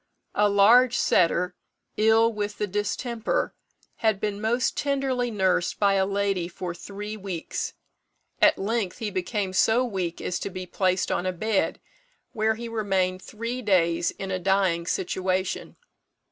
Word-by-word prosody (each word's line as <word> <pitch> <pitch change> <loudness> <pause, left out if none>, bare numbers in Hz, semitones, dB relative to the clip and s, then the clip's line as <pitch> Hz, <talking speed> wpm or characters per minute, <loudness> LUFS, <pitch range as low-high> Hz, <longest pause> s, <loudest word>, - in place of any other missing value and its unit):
A 205 0 +3
large 235 +5 +6
setter, 180 0 +2 0.4
ill 225 +2 +4
with 205 -1 -3
the 210 - 0
distemper, 210 +4 -2 0.4
had 220 -3 +1
been 205 -1 -2
most 235 +4 +1
tenderly 270 -3 0
nursed 190 -5 +1
by 200 -1 +4
a 190 -1 +2
lady 195 -3 0
for 175 0 -5
three 205 +4 -7
weeks. 190 -5 -4 0.7
At - - +6
length 205 -2 -1
he 220 -4 -3
became 190 +1 -2
so 225 +6 +3
weak 185 -7 -3
as 180 - -2
to - - -4
be 185 -1 -6
placed 185 0 0
on 185 - 0
a - - +1
bed, 205 +3 0 0.5
where 220 -1 +1
he 235 +1 -6
remained 190 -5 0
three 230 +5 -5
days 170 -5 +2
in 195 0 -6
a 185 - -1
dying 185 -3 +1
situation. 185 +1 -1
200 Hz, 145 wpm, -26 LUFS, 185-220 Hz, 0.7 s, large